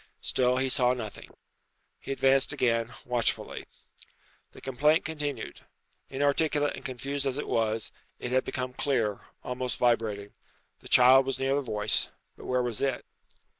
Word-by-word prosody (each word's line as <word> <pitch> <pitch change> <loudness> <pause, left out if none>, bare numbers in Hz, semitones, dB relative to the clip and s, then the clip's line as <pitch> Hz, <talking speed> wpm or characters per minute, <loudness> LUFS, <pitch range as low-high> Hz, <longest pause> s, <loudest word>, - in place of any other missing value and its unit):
Still 125 0 +2
he 130 +1 +1
saw 125 -1 +3
nothing. 115 -4 -7 0.7
He - - -7
advanced 135 0 +3
again, 115 -1 +1
watchfully. 120 -2 -1 0.9
The - - -14
complaint 150 +6 +2
continued. 150 -3 -4 0.5
Inarticulate 145 +2 +1
and - - -10
confused 140 +1 -3
as 135 0 -1
it 145 - -4
was, 110 -1 0 0.3
it 125 - -5
had 130 0 +2
become 125 0 -4
clear 115 -7 0 0.2
almost 125 0 -3
vibrating. 110 -4 0 0.5
The - - -12
child 130 +1 +7
was 135 - -1
near 135 0 +1
the 145 - +1
voice; 105 -5 0 0.3
but - - -12
where 125 0 +1
was 120 -3 -2
it? 135 -3 -1
130 Hz, 145 wpm, -28 LUFS, 120-135 Hz, 0.9 s, child